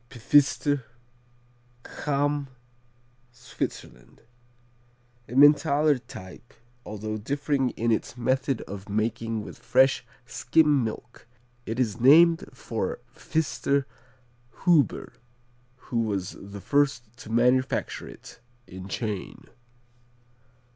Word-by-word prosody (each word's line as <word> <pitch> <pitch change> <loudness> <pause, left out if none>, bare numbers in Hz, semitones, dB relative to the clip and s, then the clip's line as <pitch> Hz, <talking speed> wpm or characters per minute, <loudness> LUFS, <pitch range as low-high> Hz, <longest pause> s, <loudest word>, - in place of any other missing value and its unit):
Pfister 145 +2 +2 1.0
Cham, 145 0 -1 0.8
Switzerland 65 - -7 1.1
Emmentaler 145 +2 +4
type, 95 +1 -12 0.3
although 110 0 -5
differing 140 +3 -1
in 115 +1 +1
its 115 +2 -2
method 130 +1 0
of 100 +1 -9
making 110 +1 -2
with - - -11
fresh 135 0 +3 0.2
skim 145 +2 +2
milk. 115 +2 -7 0.4
It 115 +3 -3
is 115 -3 0
named 165 +6 +6
for 480 - -4 0.2
Pfister 140 -3 -1 0.8
Huber 170 -6 +2 0.6
who 125 -2 -4
was 100 -4 -2
the 100 0 -10
first 135 -5 0
to 115 - -11
manufacture 125 +3 +1
it, - - -13 0.3
in 95 +1 -10
Chain. 105 -1 -5
125 Hz, 90 wpm, -26 LUFS, 110-145 Hz, 1.1 s, named